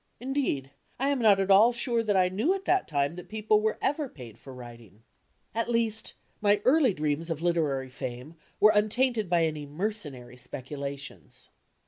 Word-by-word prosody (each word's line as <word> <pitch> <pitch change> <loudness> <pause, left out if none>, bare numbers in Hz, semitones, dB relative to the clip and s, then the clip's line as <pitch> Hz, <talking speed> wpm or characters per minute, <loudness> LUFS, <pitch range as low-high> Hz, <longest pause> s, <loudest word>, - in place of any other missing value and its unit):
Indeed, 245 - -2 0.3
I 270 +2 +1
am 280 -2 +1
not 210 -4 +5
at 195 0 +1
ail 215 +5 +7
sure 235 -1 0
that 210 -3 +1
I 185 -1 +4
knew 220 - +1
at 390 -1 -7
that 375 +1 +2
time 145 +1 0
that 180 - -10
people 215 0 +2
were 220 0 0
ever 290 0 0
paid 115 - -12
for 135 - -12
writing. 120 -4 -12 0.5
At 230 +1 -1
least, 230 -2 -1 0.3
my 205 0 +3
early 260 -6 +4
dreams 150 +2 -1
of 165 0 -3
literary 150 -7 0
fame 125 +4 -7 0.3
were 215 - +7
untainted 215 0 +1
by 170 -2 +3
any 155 -2 -4
mercenary 145 - -4
speculations. 140 +2 -7
190 Hz, 170 wpm, -28 LUFS, 140-230 Hz, 0.5 s, ail